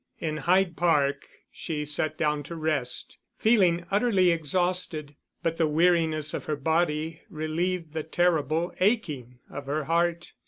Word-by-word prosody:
In 155 -1 -2
Hyde 175 +3 +2
Park 145 -5 +1 0.2
she 150 -2 -4
sat 155 +1 0
down 150 -2 0
to 170 - -7
rest, 155 -6 -1 0.2
feeling 185 -7 +3
utterly 195 -4 +3
exhausted; 165 -2 -1 0.3
but 165 0 -1
the 160 - +2
weariness 160 -1 +2
of - - -4
her 155 - -1
body 160 +1 0
relieved 165 0 -2
the 160 - -2
terrible 165 0 0
aching 150 - 0
of 140 -1 -7
her 150 +2 -1
heart. 170 +2 0
160 Hz, 135 wpm, -27 LUFS, 150-175 Hz, 0.3 s, feeling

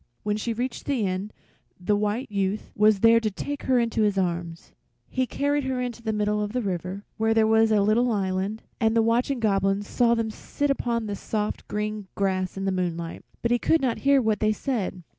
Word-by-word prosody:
When 210 0 0
she 215 +2 -2
reached 245 +3 -3
the 260 -7 0
end 190 +3 -2 0.5
the 195 +3 +1
White 210 +4 -1
Youth 200 +1 -2
was 210 -1 +4
there 230 0 +7
to 225 -2 -1
take 285 +8 -5
her 255 - +5
in 235 -1 0
his 210 -3 +1
arms. 170 -2 -2 0.4
He 255 -1 -1
carried 285 +2 0
her 255 -1 -1
to 235 - -14
the 220 -1 -1
middle 210 0 0
of 210 +1 -3
the 250 - 0
river, 190 +1 -4
where 225 0 +2
there 220 -1 +5
was 220 0 +4
a 210 -2 +4
little 235 +4 +3
island, 195 +1 -1 0.2
and 225 -2 +2
the 225 - +4
watching 240 +4 +1
Goblin 195 -2 +1
saw 235 +3 +2
them 225 -1 -1
sit 285 +6 -2
upon 235 -4 -1
the 205 -1 -3
soft 210 +1 -3
green 210 -1 -3
grass 190 -2 -1
in 195 - -3
the 195 - +1
moonlight, 170 -3 -3 0.2
but 235 - +1
he 240 - +3
could 325 - +3
not 250 -5 0
hear 275 -1 +4
what 215 -2 +1
they 215 0 +2
said. 210 -7 -3
215 Hz, 215 wpm, -25 LUFS, 195-235 Hz, 0.5 s, there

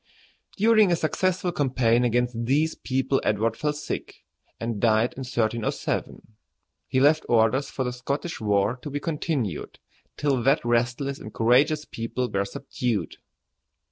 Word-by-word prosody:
During 215 -2 +5
a - - +4
successful 180 +3 0
campaign 125 -6 +2
against 120 -1 0
these 150 +6 +2
people 135 0 -1
Edward 110 +2 +1
fell 150 +3 -1
sick, 150 0 -6 0.4
and 115 -2 -3
died 110 +1 +3
in - - -10
1307. 115 -3 -2 0.6
He 130 - +1
left 150 +3 +4
orders 120 +4 +3
for 130 - -3
the 125 -1 -3
Scottish 140 +6 -4
war 105 +2 +1
to 150 - -6
be 145 +1 -3
continued 145 - -3 0.4
till 140 -4 +1
that 135 +2 +2
restless 120 +4 0
and 110 - -9
courageous 140 +8 +3
people 120 +2 -4
were 100 0 0
subdued. 120 0 -3
125 Hz, 140 wpm, -25 LUFS, 115-145 Hz, 0.6 s, During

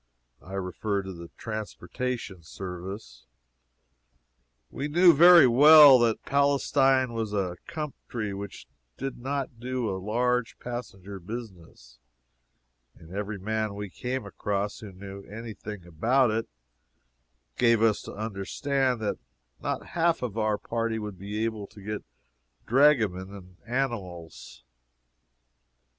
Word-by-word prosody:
I 95 - -12
refer 95 +2 -2
to 85 -3 -8
transportation 110 -1 -5
service. 90 - -8 1.4
We 140 - -3
knew 170 +3 +6
very 170 +2 +9
well 145 +2 +9
that 115 -2 +1
Palestine 135 -2 +2
was 110 -2 -3
a 90 -3 -1
country 125 -8 -5
which 100 0 -7 0.3
did 135 -2 -5
not 135 -2 -4
do 125 -1 -2
a 95 0 -4
large 125 +3 0
passenger 100 -5 -7
business, 90 - -10 1.0
and 80 +1 -16
every 100 +2 -4
man 110 +1 -2
we 100 -2 -6
came 130 +5 -4
across 100 0 -3
who 105 -3 -9
knew 100 +1 -9
any 110 +2 -8
thing 105 -4 -9
about 115 - +2
it 110 +1 -2 1.1
gave 115 -2 +3
us 110 -2 +3
to - - -9
understand 115 +5 -1
that 105 - -2 0.4
not - - -3
half 170 -4 +1
of 115 -5 -3
our 110 -2 +1
party 115 0 -2
would 105 -4 -6
be 105 +3 -3
able 110 -3 -4
to 105 - -16
get 105 +1 -5 0.6
dragomen 110 -9 +3
and 90 -2 -13
animals. 105 - -4
110 Hz, 120 wpm, -27 LUFS, 100-125 Hz, 1.4 s, very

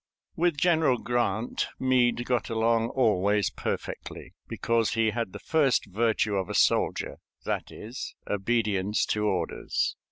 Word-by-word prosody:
With 170 -2 +1
General 160 -5 +3
Grant 120 -2 -1
Meade 120 -2 +2
got 120 -5 0
along 115 0 +1
always 105 -5 +2
perfectly, - - -5
because 115 -1 0
he 110 -1 +2
had 115 -3 -3
the 105 - -7
first 140 +3 +2
virtue 105 0 0
of 95 -2 -2
a - - -3
soldier - - +1 0.3
that - - -2
is, 115 +5 -7
obedience 105 -1 0
to 105 - -1
orders. 90 -5 -1
115 Hz, 130 wpm, -27 LUFS, 105-120 Hz, 0.3 s, General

